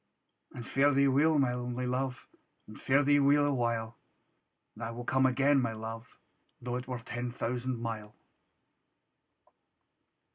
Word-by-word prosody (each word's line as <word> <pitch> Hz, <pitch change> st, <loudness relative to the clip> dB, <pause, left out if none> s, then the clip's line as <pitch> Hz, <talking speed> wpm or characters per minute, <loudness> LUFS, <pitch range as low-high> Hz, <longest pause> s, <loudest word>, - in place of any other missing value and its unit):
And 120 Hz, -2 st, -8 dB
fare 140 Hz, +3 st, +2 dB
thee 140 Hz, 0 st, +4 dB
weel, 150 Hz, +4 st, +3 dB
my 130 Hz, -3 st, +2 dB
only 125 Hz, 0 st, -3 dB
Luve, 125 Hz, 0 st, -2 dB, 0.4 s
And 110 Hz, -, -13 dB
fare 140 Hz, +2 st, +3 dB
thee 145 Hz, +1 st, +4 dB
weel 145 Hz, +1 st, +4 dB
a 145 Hz, -, +1 dB
while! 115 Hz, -2 st, -2 dB, 0.7 s
And 120 Hz, -, -9 dB
I 115 Hz, -, -3 dB
will 120 Hz, +1 st, -6 dB
come 130 Hz, +1 st, +3 dB
again, 135 Hz, +2 st, +3 dB
my 115 Hz, -2 st, -1 dB
Luve, 115 Hz, +2 st, -8 dB, 0.4 s
Tho' 125 Hz, 0 st, -3 dB
it 125 Hz, 0 st, -7 dB
were 125 Hz, -1 st, -3 dB
ten 120 Hz, +1 st, -5 dB
thousand 125 Hz, +1 st, -3 dB
mile. 110 Hz, -2 st, -6 dB
125 Hz, 150 wpm, -31 LUFS, 115-135 Hz, 0.7 s, thee